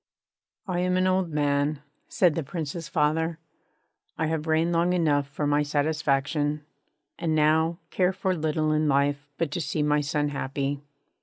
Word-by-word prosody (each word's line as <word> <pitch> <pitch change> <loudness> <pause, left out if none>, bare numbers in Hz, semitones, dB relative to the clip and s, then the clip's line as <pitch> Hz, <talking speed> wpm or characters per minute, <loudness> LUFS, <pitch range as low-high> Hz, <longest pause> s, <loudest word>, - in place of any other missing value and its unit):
'I 180 -2 -1
am 180 0 +1
an 185 - +2
old 185 -1 +1
man,' 145 -1 0 0.3
said 175 -4 +3
the 165 - -1
Prince's 160 +1 -5
father; 160 +3 +1 0.8
'I 160 - 0
have 160 0 -2
reigned 160 +2 +2
long 170 +1 +2
enough 150 -5 +2
for 140 +2 -3
my 145 0 +3
satisfaction, 145 0 0 0.5
and 160 -2 0
now 160 +2 +3
care 180 0 +2
for 190 0 -1
little 155 -1 0
in 155 0 +2
life 140 0 +1
but 165 -3 -1
to 175 - -2
see 150 0 -1
my 150 0 +2
son 145 0 0
happy.' 140 0 -3
155 Hz, 160 wpm, -26 LUFS, 145-165 Hz, 0.8 s, said